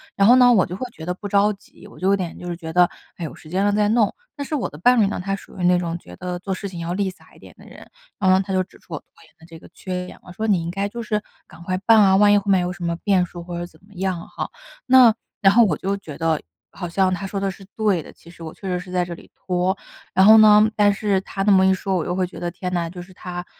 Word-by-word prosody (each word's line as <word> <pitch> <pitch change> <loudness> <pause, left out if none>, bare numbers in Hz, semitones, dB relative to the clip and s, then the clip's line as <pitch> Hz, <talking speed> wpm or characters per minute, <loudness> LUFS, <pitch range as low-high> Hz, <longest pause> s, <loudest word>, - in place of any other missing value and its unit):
然 195 - +3
后 245 +4 +7
呢， 245 -1 +6
我 195 -6 +4
就 180 - -7
会 255 - -4
觉 160 - -10
得 180 - -2
不 205 +3 -7
着 200 +1 +3
急， 200 0 -14
我 - - -15
就 185 - -1
有 200 - +4
点 180 -4 -5
就 180 - -8
是 175 - -3
觉 165 -1 -8
得， 180 +1 +4 0.3
哎， 170 - -5
有 - - -8
时 155 - -15
间 190 +4 0
了 205 - +2
再 210 0 +2
弄。 220 -2 +2 0.2
但 285 - -4
是 310 - -2
我 275 - -1
的 150 - -12
伴 245 +7 +4
侣 - - +4
呢， 195 - -3
他 195 +1 -1
属 195 - -13
于 - - -3
那 180 0 +4
种 170 -1 -3
觉 90 - -13
得 180 - -5
做 190 +2 -6
事 200 +2 -5
情 180 -3 -8
要 170 +1 -3
立 195 +1 -1
洒 185 - -22
一 - - -18
点 - - -15
的 - - -15
人， - - -14 0.3
然 190 -2 +2
后 185 - +5
他 190 0 -3
就 185 0 +2
指 - - -20
出 170 - -13
我 150 - -3
拖 - - -36 0.2
延 160 - -22
的 160 - -17
这 165 -1 -13
个 - - -16
缺 180 -1 -5
点， - - -12
我 180 - -12
说 215 +5 -3
你 190 -6 +2
应 170 - -4
该 200 +2 -2
就 235 +2 -6
是， 210 -1 -1 0.3
赶 - - -15
快 185 +1 -2
办 225 -1 +6
啊， 190 -2 +5
万 205 +1 +5
一 205 - +5
后 200 - -13
面 190 - +4
有 180 0 -2
什 175 0 -9
么 170 0 -1
变 195 -3 +3
数 175 -1 -8
或 175 0 -6
者 175 - -5
怎 155 - -22
么 205 - -20
样 180 -2 -3
哈， - - -5 0.4
那 255 -3 +7 0.3
然 195 0 +5
后 235 +2 +6
我 165 -8 0
就 195 +1 -2
觉 165 -8 -9
得 160 -2 0 0.3
好 175 -3 -6
像 185 +1 +1
他 185 +2 -4
说 195 +1 -4
得 195 0 -1
是 190 - -13
对 210 -6 +1
的， - - -12
其 170 - -17
实 170 - -17
我 160 -1 -6
确 195 - -10
实 180 -1 -1
是 180 0 -10
在 180 -1 0
这 175 - -7
里 170 - -13
拖。 185 +1 -1 0.3
然 190 0 +4
后 220 +2 +9
呢， 215 0 +7
但 205 -1 +4
是 200 -2 0
他 195 0 -4
那 205 - +3
么 190 -1 +5
一 - - +5
说， 190 0 -1
我 175 - 0
就 175 - -3
会 185 0 0
觉 180 - -10
得 175 - -3
天 180 +1 -5
呐， 170 -2 -1
就 180 +1 -10
是 180 +1 -11
他 175 -1 -7
185 Hz, 345 characters per minute, -21 LUFS, 175-200 Hz, 0.4 s, 后